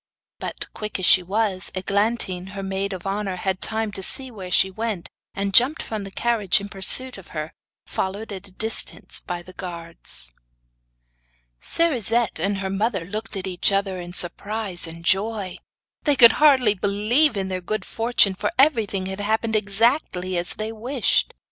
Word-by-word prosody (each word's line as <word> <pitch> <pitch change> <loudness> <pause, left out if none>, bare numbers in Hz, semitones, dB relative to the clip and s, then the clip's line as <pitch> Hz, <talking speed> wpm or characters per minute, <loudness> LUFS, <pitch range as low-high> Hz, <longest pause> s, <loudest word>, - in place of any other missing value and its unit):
But, - - -5
quick 210 0 -4
as 185 - -2
she 185 - +7
was, 195 0 -2
Eglantine, 190 -1 -1
her 195 - -4
maid 195 +1 -2
of 185 -1 -7
honour, 195 -1 -2
had 185 +1 -2
time 220 -1 -2
to 195 - -4
see 260 +7 +2
where 190 -5 -8
she 190 +1 +3
went, 215 -3 -4 0.3
and 195 0 -2
jumped 265 +9 +5
from 215 -3 -5
the - - -7
carriage 220 -2 +1
in 200 0 -8
pursuit 210 +5 +2
of 190 - -14
her, 155 +1 -4 0.3
followed 200 +4 -4
at 195 0 -8
a - - -14
distance 220 +4 -1
by 175 -1 -6
the 185 - -14
guards. 170 - -1 1.3
Cerisette 240 - +2
and 200 0 -1
her 190 0 -3
mother 195 -2 -1
looked 215 +4 -6
at 190 - -5
each 185 +1 0
other 195 -1 -1
in 175 0 -9
surprise 190 +1 0
and 165 +1 -10
joy. 195 0 0 0.4
They 290 -2 +2
could 235 -3 +9
hardly 260 -8 +5
believe 210 +7 +2
in 190 -1 -2
their 185 -1 -3
good 215 +2 -3
fortune, 225 -4 +2
for 205 +2 -2
everything 225 -9 +2
had 190 +1 -5
happened 220 +2 0
exactly 205 -3 +1
as 175 0 0
they 215 +1 -4
wished. 240 +3 0
200 Hz, 170 wpm, -23 LUFS, 185-225 Hz, 1.3 s, could